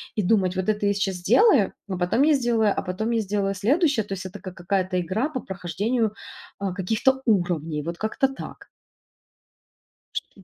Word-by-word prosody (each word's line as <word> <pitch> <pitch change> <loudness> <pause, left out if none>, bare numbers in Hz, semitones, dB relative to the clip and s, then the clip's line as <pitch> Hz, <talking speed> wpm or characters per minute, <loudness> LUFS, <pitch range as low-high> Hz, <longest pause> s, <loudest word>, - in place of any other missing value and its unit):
и 215 - +1
думать: 185 -2 +2
вот 185 0 -2
это 210 -1 0
я 200 - +3
сейчас 195 -1 -1
сделаю, 230 - +4
но 190 - -3
потом 180 +9 +2
я 310 +1 +5
сделаю, 235 -6 +2
а - - -1
потом 200 +6 -3
я 230 -1 +1
сделаю 195 -1 -1
следующее. 270 - +2
То 200 - -5
есть 190 -1 -6
это 190 +2 -8
как 185 -2 -9
какая-то 185 +1 -1
игра 190 - -1
по 265 - -4
прохождению, 205 +4 -2 0.5
а, 195 -2 -2
каких-то 220 +8 +1
уровней. 170 - +1
Вот 170 +2 -5
как-то 220 +6 0
так. 270 0 -9 1.4
Что? 195 - -7
200 Hz, 180 wpm, -24 LUFS, 185-230 Hz, 1.4 s, я